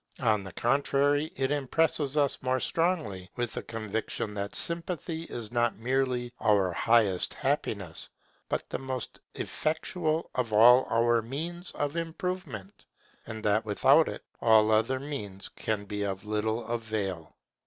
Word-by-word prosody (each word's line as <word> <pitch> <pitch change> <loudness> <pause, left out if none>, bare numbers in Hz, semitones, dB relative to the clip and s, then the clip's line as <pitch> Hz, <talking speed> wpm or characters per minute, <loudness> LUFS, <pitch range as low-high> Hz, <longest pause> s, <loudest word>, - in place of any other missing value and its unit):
On 110 -5 +2
the 95 - -8
contrary, 140 - +2
it 135 +1 0
impresses 145 0 +1
us 145 -2 +2
more 130 0 +1
strongly 125 - -1
with 120 -2 -2
the - - -3
conviction 110 -1 -3
that 100 0 -4
Sympathy 170 -1 -3
is 115 -8 -6
not 120 -2 +1
merely 125 0 0
our 100 -4 +3
highest 105 -1 +2
happiness, 105 - -1 0.4
but - - -2
the - - -4
most 130 -2 -5 0.2
effectual 160 +1 -1
of 125 -3 -1
all 120 +4 +7
our 115 0 +3
means 165 +9 -5
of 145 +1 -2
improvement; 165 - -5 0.4
and 110 0 -6
that 105 +1 +2
without 105 -2 +4
it, - - -7 0.2
all 110 -1 +5
other 115 +5 +2
means 105 -9 -6
can 105 -2 -3
be 105 +1 -4
of 100 0 -3
little 110 +2 -1
avail. 110 -8 -3
120 Hz, 140 wpm, -29 LUFS, 105-145 Hz, 0.4 s, all